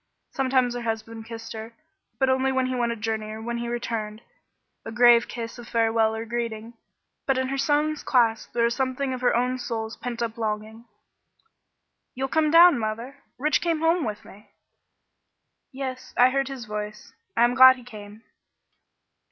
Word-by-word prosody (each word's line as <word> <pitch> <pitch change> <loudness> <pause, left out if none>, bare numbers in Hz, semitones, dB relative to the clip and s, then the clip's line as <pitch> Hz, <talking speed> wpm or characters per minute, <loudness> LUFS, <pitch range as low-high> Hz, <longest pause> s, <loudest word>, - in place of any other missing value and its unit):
Sometimes 260 -2 +1
her 245 - -4
husband 225 0 -5
kissed 225 0 -8
her, 225 +1 -8 0.4
but 265 - +2
only 260 0 +2
when 260 -1 +1
he 255 - -2
went 240 -2 0
a - - -3
journey 220 0 -3
or 215 0 -7
when 235 +1 -4
he 235 - -4
returned, 230 -2 -4 0.6
a - - -7
grave 240 +1 +5
kiss 235 0 -7
of 240 - -10
farewell 225 -1 +1
or 225 +1 -5
greeting; 230 -1 -4 0.5
but 270 -1 +2
in 260 0 -1
her 275 - -2
son's 300 +2 +1
clasp 230 -3 +1
there 235 - 0
was 235 0 +2
something 260 +1 -2
of 255 - -5
her 250 - +2
own 250 +2 0
soul's 225 -2 -4
pent 235 -1 -4
up 230 0 -5
longing. 220 +1 -4 1.3
"You'll 265 +1 -2
come 315 0 +2
down, 335 -2 +7
mother? 230 +5 -4 0.2
Rich 300 +3 +1
came 330 -2 0
home 330 +1 +2
with 210 -3 -5
me." 205 +2 -16 1.2
"Yes, 260 -1 -6
I 250 +1 +6
heard 275 0 0
his 265 -3 -7
voice. 210 0 -7 0.2
I 235 - +5
am 240 +1 +3
glad 260 0 +8
he 250 - -14
came." 215 -2 -12
235 Hz, 175 wpm, -25 LUFS, 225-260 Hz, 1.3 s, glad